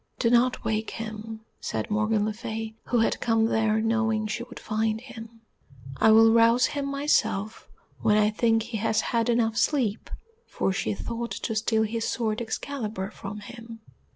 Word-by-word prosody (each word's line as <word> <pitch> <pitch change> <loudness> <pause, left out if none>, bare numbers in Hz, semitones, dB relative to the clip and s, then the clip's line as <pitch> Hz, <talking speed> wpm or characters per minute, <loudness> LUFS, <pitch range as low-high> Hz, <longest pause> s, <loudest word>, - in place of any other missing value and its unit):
"Do 230 - +1
not 245 +1 +3
wake 220 0 -1
him," 220 0 -7 0.2
said 110 - -4
Morgan 215 0 +1
le 215 - -1
Fay, 220 0 -5
who 240 -2 +1
had - - +1
come 225 -1 +2
there 220 -1 +2
knowing 225 -1 +1
she 215 +2 -3
would 245 0 -9
find 220 0 -1
him, 230 -2 -11 0.6
"I 220 - +4
will 225 +1 +7
rouse 230 +1 +5
him 285 -1 -2
myself 275 -7 0 0.3
when 210 - +3
I 210 0 +3
think 225 0 +2
he 230 -1 -5
has 220 +1 +1
had 230 0 0
enough 225 -2 +1
sleep," 235 -8 0 0.4
for 195 - -1
she 200 +1 -1
thought 235 +3 -4
to 225 - -4
steal 220 0 +1
his 225 +1 -2
sword 225 -1 -1
Excalibur 220 -4 -4
from 210 0 -8
him. 230 +1 -10
225 Hz, 170 wpm, -26 LUFS, 215-235 Hz, 0.6 s, will